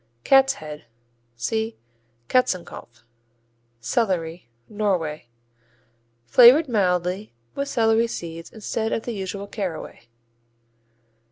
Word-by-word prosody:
Cat's 270 0 +5
Head 150 - -9 0.5
see 220 - -2 0.5
Katzenkopf. 175 - -1 0.8
Celery 170 - -1 0.2
Norway 180 - -2 1.0
Flavored 250 - +7
mildly 185 - 0 0.2
with 280 0 -3
celery 225 -1 +2
seeds, 165 -6 -7
instead 220 +1 -3
of 225 - -2
the 240 - -4
usual 200 0 -5
caraway. 190 - -6
200 Hz, 85 wpm, -23 LUFS, 165-230 Hz, 1.0 s, Flavored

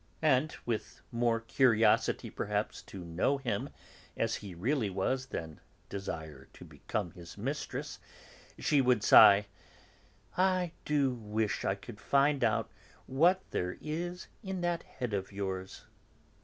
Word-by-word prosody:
and, 150 0 +3
with 115 -3 -3
more 115 -1 +1
curiosity 115 -1 +3
perhaps - - -2
to 95 -3 -9
know 85 +12 +1
him 120 -7 -2 0.5
as 115 0 0
he 100 -4 -9
really 115 - 0
was 130 +8 -1
than 80 -10 -6 0.3
desire 80 -8 -6
to - - -12
become 95 -6 -4
his 85 +1 -12
mistress, 135 +8 -4 0.6
she 145 -2 +3
would 125 -4 +3
sigh: 100 0 +8 0.9
"I 185 -2 +2
do 140 -3 +2
wish 110 -3 -2
I 95 - +1
could 105 +2 -11
find 140 -1 +3
out 110 -2 +1 0.3
what 175 +8 +3
there 90 0 -2
is 175 +4 -4
in 190 -4 -4
that 175 -1 0
head 125 -4 -5
of 95 -1 -2
yours!" 95 -1 -5
115 Hz, 130 wpm, -32 LUFS, 100-145 Hz, 0.9 s, sigh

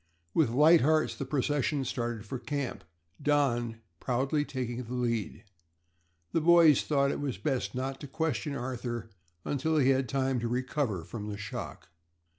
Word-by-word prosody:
With 155 -7 +3
light 155 +7 +6
hearts 155 +3 +3
the 135 - -5
procession 145 0 0
started 120 -3 -3
for 125 +4 -5
camp, 140 0 -4 0.4
Don 120 -6 +1 0.2
proudly 135 +4 0
taking 125 -3 -4
the 125 +1 -6
lead. 115 -4 -2 0.9
The 165 - +1
boys 165 -3 +6
thought 140 -2 +2
it - - -3
was 140 -4 -3
best 135 -4 -2
not 135 +1 -3
to 145 - -6
question 150 0 -2
Arthur 120 -3 -4 0.3
until 155 +3 0
he 135 -3 +4
had 135 - +5
had 130 -3 -2
time 135 -1 0
to 115 - -2
recover 125 - -1
from 105 +5 -6
the 100 - -4
shock. 100 -3 -7
130 Hz, 160 wpm, -30 LUFS, 120-145 Hz, 0.9 s, light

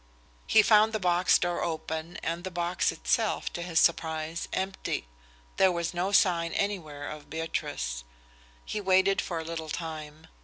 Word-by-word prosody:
He 220 - +6
found 215 +1 +5
the 215 - 0
box 180 -1 +4
door 175 -1 -1
open 160 0 -4
and 170 +1 -2
the 190 - -3
box 175 0 0
itself, - - 0
to 175 - -4
his 170 -2 +1
surprise, 160 -1 +1
empty. 190 - -2 0.5
There 190 -1 +5
was 170 0 -2
no 180 +3 -1
sign 170 -4 +3
anywhere 155 -8 -2
of 150 -1 -8
Beatrice. 160 - -3 0.6
He 210 - -3
waited 190 0 +3
for 170 - -4
a 160 - -3
little 160 -1 -5
time. 155 -1 -6
170 Hz, 155 wpm, -28 LUFS, 160-185 Hz, 0.6 s, He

